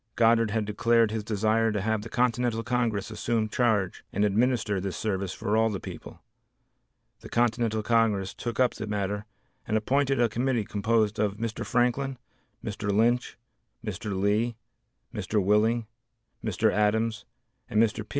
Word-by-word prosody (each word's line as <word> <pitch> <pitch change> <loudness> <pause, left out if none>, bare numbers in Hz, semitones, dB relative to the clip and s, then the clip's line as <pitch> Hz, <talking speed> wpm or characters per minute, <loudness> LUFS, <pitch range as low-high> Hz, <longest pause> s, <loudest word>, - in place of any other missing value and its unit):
Goddard 115 -1 +4
had 110 0 -1
declared 115 +1 +2
his 110 -1 -2
desire 110 +2 +1
to 105 - -1
have 110 +2 0
the 115 - -8
Continental 120 -2 +1
Congress 115 -4 -1
assume 115 -2 -1
charge 110 -5 +1
and 100 +2 +1
administer 105 -2 +1
this 95 -1 -4
service 100 -4 -2
for 105 +2 -2
all 110 0 +3
the 100 -3 -3
people. - - -10 1.0
The - - -11
Continental 115 -2 +1
Congress 105 -4 +2
took 120 -1 -5
up 125 -2 +4
the 110 - -6
matter 105 0 -2 0.4
and 110 - +2
appointed 135 +4 +1
a 120 - +4
committee 120 0 0
composed 110 +1 +1
of 105 -1 0
Mr. 115 0 -3
Franklin, 125 +2 0 0.5
Mr. 105 -1 -2
Lynch, 115 +4 +1 0.5
Mr. 100 -3 -3
Lee, 105 +4 +1 0.6
Mr. 105 - -1
Willing, 105 +4 +2 0.6
Mr. 110 +1 +1
Adams, 110 +1 +1 0.4
and 105 - +1
Mr. 110 -1 +2
P. - - -24
110 Hz, 150 wpm, -27 LUFS, 105-115 Hz, 1.0 s, Goddard